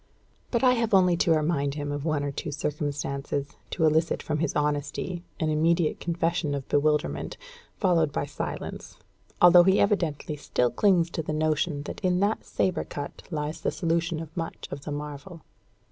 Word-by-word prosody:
But 235 +1 0
I 255 - +7
have 230 -4 +2
only 180 -2 +5
to 165 - +2
remind 150 -3 +1
him 145 -1 -3
of 145 0 -4
one 155 -3 0
or 145 - -2
two 145 +2 -5
circumstances, 145 -1 -3 0.2
to 160 - +1
elicit 160 +1 +2
from 150 -1 -2
his 160 -2 -1
honesty 150 +4 -1 0.2
and 155 -3 +1
immediate 165 +1 +2
confession 170 -3 -1
of 135 -2 -5
bewilderment, 150 +1 +1 0.4
followed 170 -6 +2
by - - -1
silence; - - -6 0.5
although 175 0 +9
he 190 +2 +4
evidently 165 -7 0
still 125 -4 0
clings 180 -5 +3
to 165 - -2
the 155 0 -4
notion 155 -1 0
that - - -7
in 180 -1 +2
that 205 +2 +1
sabre 185 - 0
cut 145 -1 -7
lies 150 -2 -3
the - - +1
solution 165 -1 -1
of 160 -1 -8
much 165 -1 -5
of 140 0 -7
the 150 - -4
marvel. 150 +3 -7
155 Hz, 175 wpm, -27 LUFS, 145-175 Hz, 0.5 s, although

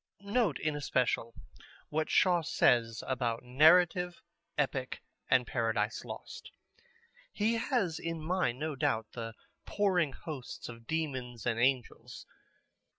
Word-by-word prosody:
Note 205 - +1
in 155 -1 -1
especial 125 -5 0 0.5
what 155 +1 -1
Shaw 180 -2 +4
says 120 -7 +2
about 120 -3 -1
narrative, 175 +7 +4 0.3
epic, - - -1 0.3
and - - +4
Paradise - - -1
Lost. - - -9 0.8
He 215 +2 +1
has 215 - 0
in 165 -1 -3
mind, 155 -6 0
no 155 +1 -3
doubt, 120 -6 0
the 115 -2 -6 0.3
pouring 180 -8 +1
hosts 140 -6 -7
of 115 -1 -11
demons 130 -7 -3
and 115 -1 0
angels. 125 -1 -1
150 Hz, 115 wpm, -32 LUFS, 125-175 Hz, 0.8 s, Shaw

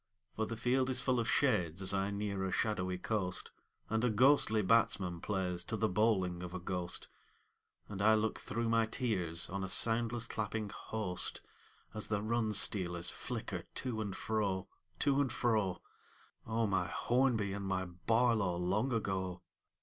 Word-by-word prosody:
For 110 0 -1
the 115 - -4
field 130 +2 +1
is 130 -1 +1
full 130 -2 +2
of 115 - 0
shades 95 - +2
as 95 0 +1
I 100 0 +1
near 100 -1 -2
a 95 - -1
shadowy 95 -3 0
coast, 90 -2 -2 0.4
And 110 +1 0
a 125 - +3
ghostly 110 -1 +4
batsman 95 -5 +2
plays 90 -3 -1
to 110 - -3
the 110 - +2
bowling 95 -4 +1
of 90 0 -6
a - - -3
ghost, 90 0 -3 0.8
And 100 -2 -5
I 110 +1 +6
look 110 0 0
through 115 +1 -2
my 115 -1 +3
tears 95 - 0
on 100 +1 -4
a 95 - -2
soundless 115 +2 +2
clapping 110 -2 -3
host 105 -5 -2 0.5
As 110 -1 -2
the 105 -1 -1
run 110 0 0
stealers 90 -4 +1
flicker 110 -7 -5
to 120 -4 -2
and 100 -3 -3
fro, 100 -4 -1 0.3
To 140 0 +3
and 130 -4 0
fro: 110 -7 0 0.6
O 115 +1 +1
my 95 -3 +1
Hornby 120 -5 +1
and 100 -1 -4
my 95 -1 0
Barlow 105 +2 +1
long 100 +9 0
ago 95 -5 -2
105 Hz, 165 wpm, -34 LUFS, 95-115 Hz, 0.8 s, I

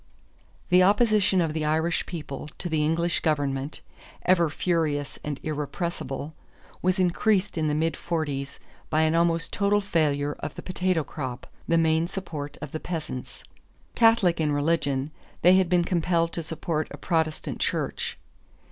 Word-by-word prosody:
_ - - -32
The 180 0 +6
opposition 205 -1 +4
of 160 -2 0
the 155 -1 -2
Irish 160 +2 +1
people 150 -4 -6
to 175 - -5
the 155 -2 +1
English 165 +2 +1
government, 145 -2 -1 0.4
ever 170 -3 +4
furious 155 -3 -1
and 145 -2 -4
irrepressible, 150 -1 -3 0.5
was 185 +1 +2
increased 190 +2 +2
in 160 -2 0
the 150 - +1
mid 160 +2 +1
forties 145 -5 -3 0.3
by 155 0 +2
an 160 0 +2
almost 165 0 +2
total 205 0 +3
failure 150 -7 0
of 145 - -5
the - - -8
potato 185 -3 0
crop, 130 -3 -6 0.2
the 165 - +3
main 160 0 +3
support 150 -6 -6
of - - -6
the 155 - -4
peasants. 155 -8 -6 0.5
Catholic 225 -8 +4
in 150 -1 +1
religion, 145 -2 0 0.3
they 180 +2 +7
had 185 -2 +2
been 180 -1 +4
compelled 170 -1 +1
to 170 - -2
support 160 -1 -2
a 145 - -8
Protestant 160 0 -1
church. - - -2
165 Hz, 155 wpm, -26 LUFS, 150-175 Hz, 0.5 s, they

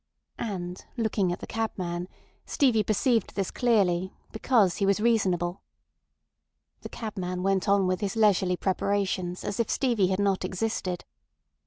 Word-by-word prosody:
And 180 -5 -4
looking 215 -5 +1
at 175 - -4
the - - -5
cabman, 180 -6 -3 0.4
Stevie 245 -6 +3
perceived 225 +3 +1
this 195 -2 -1
clearly, 190 -7 +1 0.2
because 220 -5 +2
he 200 - +1
was 200 +1 +3
reasonable. 190 -6 +1 1.2
The - - -7
cabman 185 -5 -4
went 195 0 +1
on 200 -1 +4
with 185 +2 0
his 200 0 -2
leisurely 195 -4 +3
preparations 190 -2 -1
as 200 - -3
if 230 - +1
Stevie 235 -8 +2
had 190 0 0
not 200 -2 +1
existed. 185 -1 -2
195 Hz, 140 wpm, -27 LUFS, 180-220 Hz, 1.2 s, on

